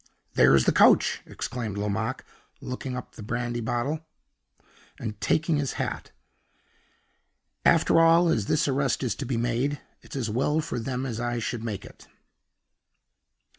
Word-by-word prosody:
"There's 65 0 +5
the - - +4
coach!" - - +5
exclaimed 110 -5 -4
Lomaque, 110 +5 -2 0.3
locking 125 0 -5
up 125 - -8
the - - -11
brandy 120 +2 -2
bottle, 120 +7 -1 1.0
and 110 -2 -6
taking 160 -1 +2
his 140 -2 -1
hat. - - -4 1.5
"After 165 - +5
all, 165 +1 +6
as 110 -10 +1
this 155 - +2
arrest 135 -1 0
is 120 -5 0
to 135 +4 -6
be 125 -2 -1
made, 120 +5 0 0.2
it's - - -12
as 130 -5 -1
well 135 +8 +1
for 150 -5 -3
them 125 +2 -3
that 120 -4 -4
I 120 0 -1
should 115 0 -3
make 105 -4 -4
it." - - -15
120 Hz, 145 wpm, -26 LUFS, 115-140 Hz, 1.5 s, all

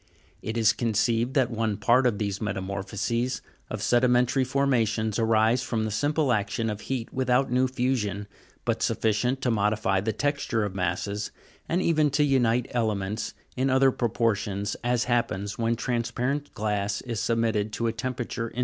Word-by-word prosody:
It 110 +1 -4
is 110 -2 +4
conceived 115 +2 0
that 130 -3 +3
one 110 -2 -1
part 125 +2 +4
of 110 -4 0
these 100 -1 -2
metamorphoses 100 +4 -2 0.3
of - - -4
sedimentary 125 +1 +3
forma 135 -2 +2
tions 110 0 -1
arises 115 +2 +3
from 115 -4 -1
the 110 - -2
simple 145 +3 +1
action 110 +1 -1
of 105 0 -6
heat 125 -4 -4
without 130 0 +1
new 130 +1 +3
fusion, 120 -6 -1 0.4
but - - 0
sufficient 125 +5 +1
to 125 - +2
modify 105 -3 +1
the 110 +3 0
texture 145 -4 -1
of 100 -2 -3
masses, 100 +3 -2 0.4
and 180 +3 +1
even 155 -3 +3
to 145 +2 +2
unite 125 -4 +2
elements 110 -3 -1 0.2
in 130 +1 +1
other 130 0 +4
propor 115 -2 +1
tions, 100 0 -3
as 120 -1 +1
happens 105 -4 -1
when 115 0 +1
transparent 125 +4 -2
glass 105 -1 -1
is 115 -4 -4
submitted 110 -2 0
to 115 - -2
a 115 - +1
temperature 120 -1 -3
in. 120 - -8
115 Hz, 165 wpm, -26 LUFS, 105-125 Hz, 0.4 s, is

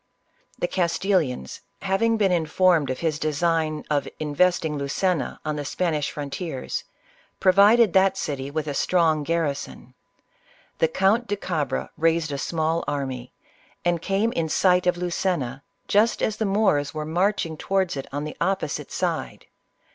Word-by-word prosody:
The - - -1
Castilians 170 - 0 0.2
having 225 +4 +2
been 200 -3 +2
informed 170 -2 +2
of 130 - -3
his 155 -3 0
design 155 0 0
of 145 -2 0
investing 160 +1 +1
Luceua 155 +4 -1
on 155 -1 -2
the 145 - -3
Spanish 155 -1 -1
frontiers, 145 -1 -4 0.6
provided 200 +3 +5
that 190 0 +4
city 140 -2 -3
with 155 +1 -2
a 145 - -3
strong 160 0 +2
garrison. 155 -2 -3 0.9
The 160 - +4
Count 195 +8 +2
de 205 - 0
Cabra 155 -9 -2
raised 165 -1 +1
a 140 - -3
small 160 +2 -1
army, 130 -3 -3 0.5
and 175 -1 +1
came 195 +6 +1
in 165 -5 -1
sight 180 +2 +3
of 180 - +2
Lucena 170 -7 -2 0.3
just 215 +3 +2
as 215 - 0
the 220 - 0
Moors 195 -8 +1
were 155 0 -3
marching 175 0 0
towards 190 +1 0
it 135 - -5
on 145 +1 -3
the 150 - -6
opposite 190 +2 -1
side. - - -3
165 Hz, 145 wpm, -24 LUFS, 150-190 Hz, 0.9 s, provided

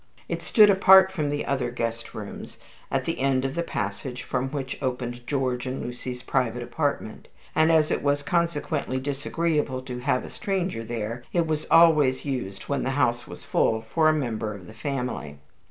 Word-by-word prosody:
It - - -3
stood 210 -2 +6
apart 190 0 +7
from 155 -6 -1
the 145 0 -2
other 130 -3 0
guest 115 -1 -4
rooms, 105 -2 -8 0.3
at - - -1
the - - -2
end 135 -1 +2
of 135 - -2
the 170 - -1
passage 125 -3 -4
from 130 0 -2
which 135 -2 -5
opened 125 -1 -3
George 130 -3 -1
and 130 +1 -3
Lucy's 125 0 -6
private 125 -2 0
apartment; 120 -3 -3 0.3
and 160 +1 +4
as 155 -1 +4
it - - 0
was 145 0 +1
consequently 150 -4 -1
disagreeable 145 0 -1
to 125 -1 -6
have 125 0 0
a - - -10
stranger 190 - -2
there, 115 +1 -4
it 170 -2 +2
was 155 -1 -2
always 155 -6 +5
used 125 -9 -4
when 140 -2 -1
the 130 - -1
house 120 -4 +1
was - - -10
full 110 0 +1
for 160 -1 +5
a - - +4
member 110 -7 -2
of 95 -3 -11
the 110 - -12
family. 125 - -4
130 Hz, 185 wpm, -25 LUFS, 120-155 Hz, 0.3 s, apart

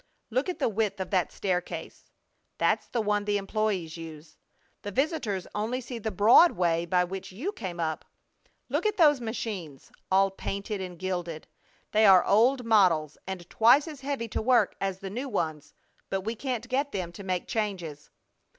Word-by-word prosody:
Look 255 +9 0
at 360 - -3
the 290 - +1
width 210 -3 -1
of 190 - -4
that 185 -4 +1
staircase! 180 -2 -4 0.5
That's - - +1
the 235 - -1
one 205 -1 0
the 205 0 +1
employees 195 -5 -2
use. 160 -1 -10 0.5
The 205 - -5
visitors 225 - -1
only 220 +5 -1
see 245 -1 -7
the 220 - -2
broad 220 - +6
way 170 -1 +1
by 180 +1 +3
which 190 +2 -6
you 265 - -3
came 185 - -6
up. 160 -2 -2 0.6
Look - - 0
at 425 0 -1
those 295 -6 +5
machines! 205 - -5 0.2
All 195 +1 +4
painted 200 +1 -4
and 180 -2 -6
gilded! 175 -3 -4 0.5
They 215 0 +5
are 190 -2 +7
old 245 +5 +3
models 180 -9 +3
and 185 -2 -6
twice 245 - +5
as 300 -4 -8
heavy 275 -4 -3
to - - -2
work 245 +2 +3
as 195 -1 -1
the 195 -1 -7
new 255 +6 -4
ones, 160 - -3 0.4
but 195 - -1
we 220 +4 -3
can't 245 0 -4
get 275 +3 0
them 180 -3 -3
to 185 +4 -10
make 185 -2 -2
changes. 175 -9 -3
200 Hz, 180 wpm, -28 LUFS, 180-235 Hz, 0.6 s, are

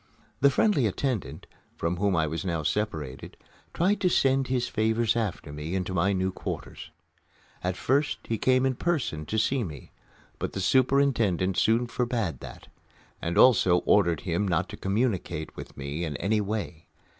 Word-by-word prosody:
The 140 - +6
friendly 140 - +2
attendant, 120 +1 -3 0.3
from 85 +1 -1
whom 100 0 +1
I 80 -2 +2
was 80 +4 -3
now 85 -4 -2
separated, 75 -9 -3 0.3
tried 190 - +1
to 180 - +3
send 135 -4 +2
his 125 -1 0
favors 110 +1 +1
after 100 -10 -3
me 75 +4 -4
into 95 0 -2
my 90 +2 +2
new 95 -1 0
quarters. - - -6 0.7
At 90 0 -1
first 140 +3 +1
he 115 -2 -3
came 130 0 +3
in 130 - +2
person 130 - -1
to 110 - -2
see 125 +4 +1
me, 75 - -8 0.5
but - - -3
the - - -3
superintendent 115 -5 +2
soon 115 +5 +3
forbade 115 - -2
that, - - -11 0.5
and 85 +1 -2
also 95 -8 +6
ordered 85 -6 +3
him 90 +3 -1
not 90 - 0
to - - -7
communicate 95 -6 -2
with - - -10
me 70 +4 -4
in 75 -4 -3
any 105 +3 +1
way. 100 -6 -4
100 Hz, 165 wpm, -27 LUFS, 85-125 Hz, 0.7 s, The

